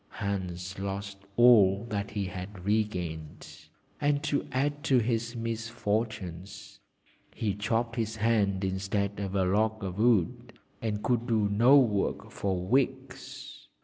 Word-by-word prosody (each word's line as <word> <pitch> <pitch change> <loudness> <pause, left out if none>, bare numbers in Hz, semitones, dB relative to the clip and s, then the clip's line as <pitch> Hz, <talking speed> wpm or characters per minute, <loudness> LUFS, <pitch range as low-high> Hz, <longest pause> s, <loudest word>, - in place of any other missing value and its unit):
Hans 95 -2 -4
lost 100 0 -4 0.2
all 110 -4 +6
that 100 -1 -2
he 105 -1 -2
had 95 0 -7
re 110 +2 +3
gained, 80 -5 -7 0.4
and 145 0 +1
to 145 -2 -1
add 145 +3 -1
to 130 - +4
his 115 0 0
misfortunes, 110 -5 -4 0.6
he 105 -3 -1
chopped 115 +3 -1
his 110 -1 -1
hand 105 -3 +1
instead 95 +1 -1
of 100 -1 -3
a 95 -1 +2
log 110 +3 +1
of 95 +1 -4
wood, 120 +1 +2 0.3
and 105 -2 -2
could 120 0 0
do 110 -4 +2
no 120 +7 +6
work 110 -7 +1
for 95 -2 -2
weeks. 130 +6 -2
105 Hz, 135 wpm, -29 LUFS, 95-115 Hz, 0.6 s, all